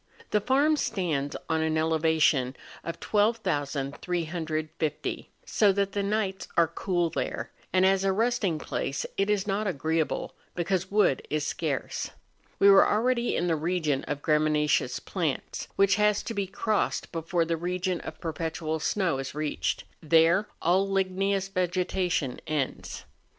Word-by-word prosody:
The 210 - +3
farm 285 +7 +3
stands 155 - -1
on 160 -1 +1
an 160 0 +1
elevation 160 -4 +2 0.3
of 170 - -5
12,350, 160 -4 -1 0.2
so 210 -2 +4
that 200 0 0
the 200 - -1
nights 200 -1 -1
are 170 -1 +5
cool 175 0 -1
there; - - -3 0.2
and 185 0 +4
as 195 0 +3
a 195 - +3
resting 220 -4 +1
place, 135 -2 -3
it 195 +1 0
is 205 -2 +1
not 205 +1 -1
agreeable, 160 -1 -1 0.2
because 185 +1 -1
wood 200 -10 +3
is 150 -1 -1
scarce. 150 -3 -2 0.5
We 200 - +5
were 195 -1 +7
already 240 +2 +1
in 175 - 0
the 170 -2 +2
region 155 -3 0
of 145 0 -4
graminaceous 150 -1 +2
plants, - - -3
which 195 -1 +4
has 210 0 +3
to 230 - -4
be 200 -2 -1
crossed 210 +2 -1
before 165 +1 0
the 165 0 0
region 180 +2 -2
of 155 - -8
perpetual 160 -1 -3
snow 175 -3 0
is 135 +1 -5
reached; 150 -1 -1 0.2
there 165 +5 +4 0.2
all 190 +4 +3
ligneous 195 0 0
vegetation 180 -6 -1
ends. 150 -4 -3
175 Hz, 140 wpm, -27 LUFS, 155-195 Hz, 0.5 s, were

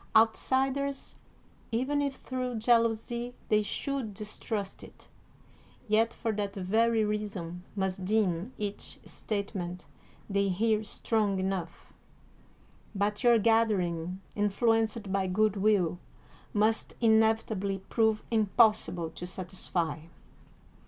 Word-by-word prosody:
Outsiders, 265 +5 +2 0.5
even 260 +5 +1
if 280 -1 -1
through 255 -2 -4
jealousy 235 +1 +1
they 215 0 +4
should 245 0 -3
distrust 210 -1 -4
it, - - -14 0.8
yet 220 +2 +3
for 230 -1 -2
that 205 -1 -3
very 220 +4 +2
reason 200 -5 -3
must 190 -1 -2
deem 195 0 +1
each 205 -2 -5
statement 195 -4 -4 0.4
they 200 -1 +1
hear 215 +3 +1
strong 210 -2 0
enough; 185 -3 -4 1.0
but 205 +1 0
your 240 -1 +6
gathering, 190 -6 +1 0.2
influenced 220 0 +1
by 195 -1 +1
good 210 +2 +2
will, 195 -4 +2 0.5
must 215 +1 +1
inevitably 220 -3 +2
prove 220 -2 +2
impossible 215 -6 +3
to 175 - -7
satisfy. 180 -4 -3
215 Hz, 100 wpm, -30 LUFS, 190-225 Hz, 1.0 s, your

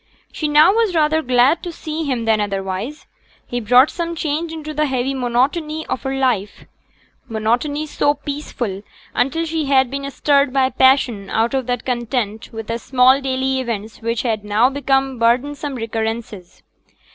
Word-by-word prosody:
She 305 - -2
now 300 +5 +6
was 440 -5 +1
rather 315 0 +3
glad 255 +4 +3
to 350 - -5
see 315 -1 -5
him 250 -5 -2
than 220 -1 +2
otherwise. 195 +7 -4 0.4
He 245 - -3
brought 250 +5 +5
some 340 -1 -3
change 315 +1 -2
into 310 -1 -6
the 305 0 +1
heavy 265 0 -1
monotony 275 +6 -1
of 250 - -3
her 270 0 -3
life 240 -7 -1 0.6
monotony 240 +7 -1
so 290 -1 +1
peaceful 280 -9 -5 0.3
until 325 +6 0
she 320 -1 -2
had 265 -2 +3
been 275 0 -4
stirred 280 -1 +2
by 265 -1 +2
passion 250 -6 +3
out 225 +2 0
of 265 -2 -1
that 245 -1 -2
content 240 -3 -2
with 225 -1 -6
the 230 +2 -3
small 260 +2 +4
daily 265 0 -1
events 225 -4 -5
which 230 0 -1
had 220 -4 -1
now 215 +5 +2
become 270 -2 0
burdensome 275 +5 0
recurrences. 225 -4 -5
260 Hz, 160 wpm, -19 LUFS, 230-290 Hz, 0.6 s, now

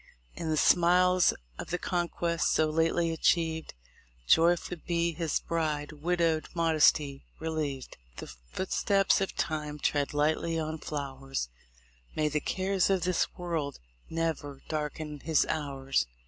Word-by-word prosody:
In 165 - -4
the 155 - +1
smiles 180 +2 +5 0.3
of - - -6
the 180 - 0
conquest 170 -2 -1
so 155 -1 +2
lately 165 +1 +2
achieved. 160 - +1 0.5
Joyful 175 - +3
be 170 -1 +1
his 165 -1 -1
bride, 155 -3 -2
"widowed 165 +1 0
modesty" 155 -4 +3 0.2
relieved, 155 -5 -3 0.2
The - - -6
footsteps 190 - 0
of 195 - -2
time 150 -2 -2
tread 145 -1 0
lightly 160 +2 +1
on 160 0 -3
flowers, 135 - -4 0.7
May 155 -1 +1
the 150 +1 0
cares 190 +2 0
of 190 -2 +2
this 180 -1 +1
world 165 -6 -3 0.3
ne'er 160 -4 -3
darken 150 -1 -4
his 160 +1 +2
hours! 135 - -1
160 Hz, 125 wpm, -29 LUFS, 150-170 Hz, 0.7 s, smiles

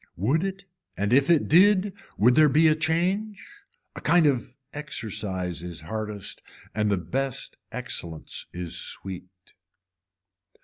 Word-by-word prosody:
Would 130 - +1
it 195 0 -4 0.3
and 100 +4 0
if 140 +3 +4
it 165 -3 +4
did 195 +3 +5 0.2
would 120 +5 +5
there 155 +2 +6
be 155 +4 +5
a 155 - +6
change. 180 +7 0 0.6
A - - -7
kind 175 -2 +4
of 125 -3 0 0.2
exercise 95 - -3
is 85 -2 -6
hardest 105 +3 -5 0.3
and 105 -1 +1
the 100 - +2
best 130 +10 -2 0.2
excellence 80 -2 -5
is 90 -1 -5
sweet. 90 -1 -7
125 Hz, 130 wpm, -26 LUFS, -, 0.6 s, there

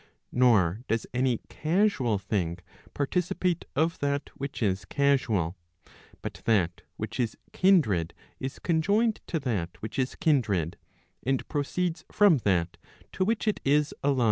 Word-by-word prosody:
Nor 110 -7 +4
does 115 0 0
any 125 -2 +1
casual 155 - +1
thing 95 -4 -2 0.4
participate 175 +3 0
of 160 +4 +1
that 140 0 -1
which 140 -2 -4
is 95 -2 +1
casual. 115 - +1 0.7
But - - -6
that 90 -7 +2 0.2
which 110 +3 -5
is 115 -3 -1 0.2
kindred 125 - +3 0.2
is 130 +1 -4
conjoined 205 +7 +1
to 165 - -1
that 100 -10 -2
which 110 +5 -5
is 130 0 0
kindred, 110 - +1 0.4
and 135 +1 -1
proceeds 160 +3 -1
from 200 -6 +5
that 90 -6 0 0.3
to 185 - 0
which 220 +2 0
it 215 - +1
is 145 +2 +2
allied. 140 -2 +2
135 Hz, 135 wpm, -28 LUFS, 105-160 Hz, 0.7 s, from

